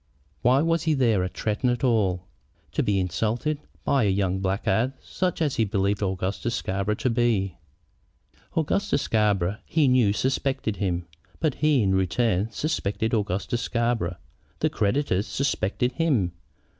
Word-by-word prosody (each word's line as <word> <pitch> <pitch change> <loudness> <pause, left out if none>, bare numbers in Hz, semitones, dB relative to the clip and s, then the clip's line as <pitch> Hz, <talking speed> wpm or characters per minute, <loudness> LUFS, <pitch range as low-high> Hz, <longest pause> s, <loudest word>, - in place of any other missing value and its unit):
Why 130 +4 +4
was 165 0 +2
he 160 -2 +3
there 115 -8 +2
at 90 - -5
Tretton 110 +4 0
at 120 0 -1
all, 100 -8 +2 0.5
to - - 0
be 100 -2 +1
insulted 110 - -1 0.2
by 135 -3 +2
a - - +3
young 95 -1 +1
blackguard 105 +6 0
such 180 -3 -2
as 145 -4 -1
he 115 - +3
believed 100 0 0
Augustus 95 +4 -1
Scarborough 100 +2 -1
to 130 - -1
be? 115 -6 +1 1.0
Augustus 180 +1 +1
Scarborough, 105 -2 +1
he 155 -4 +2
knew, 125 -5 +4
suspected 130 -1 -1
him. 90 -3 -1 0.3
But 155 -4 +1
he, 150 -6 +4
in 95 -1 +2
return, 95 +2 +1
suspected 110 -5 -2
Augustus 105 +3 -1
Scarborough. 115 -7 -1 0.4
The - - 0
creditors 105 -1 0
suspected 125 -3 0
him. 125 - +1
110 Hz, 145 wpm, -25 LUFS, 95-130 Hz, 1.0 s, Why